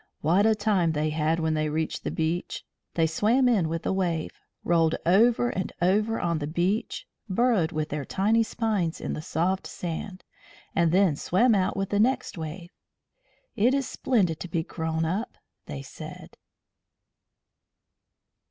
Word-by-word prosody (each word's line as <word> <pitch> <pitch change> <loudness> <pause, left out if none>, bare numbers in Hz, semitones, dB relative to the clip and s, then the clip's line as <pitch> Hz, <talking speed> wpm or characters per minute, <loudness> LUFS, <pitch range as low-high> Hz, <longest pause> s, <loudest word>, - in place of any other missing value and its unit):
What 180 +8 +3
a 220 - +4
time 200 -6 +1
they 155 0 0
had 160 +1 0
when 160 -1 0
they 155 0 0
reached 160 +1 -2
the - - -2
beach! 165 +2 -2 0.3
They 165 - +3
swam 220 +11 +2
in 200 -10 +2
with 165 0 -4
a - - +1
wave, 175 -4 -1 0.3
rolled 165 -2 +3
over 230 +7 +4
and 185 - -3
over 210 +5 +2
on 170 -2 0
the 145 - -3
beach, 180 +8 -1 0.2
burrowed 195 -5 +2
with 155 -1 -2
their 145 -1 -3
tiny 210 - +2
spines 215 -7 -1
in - - -3
the - - -4
soft 180 +4 -1
sand, 185 +3 -6 0.5
and 170 -3 +2
then 185 -4 +4
swam 225 - +2
out 190 -2 +1
with 195 -1 -1
the 205 - +1
next 250 +3 +1
wave. 170 +1 -7 0.8
"It 245 +6 +3
is 275 -2 -1
splendid 185 -11 0
to - - -5
be 165 -1 -1
grown 160 -1 -2
up," 195 +9 -3 0.3
they - - -6
said. - - -10
180 Hz, 160 wpm, -26 LUFS, 160-210 Hz, 0.8 s, a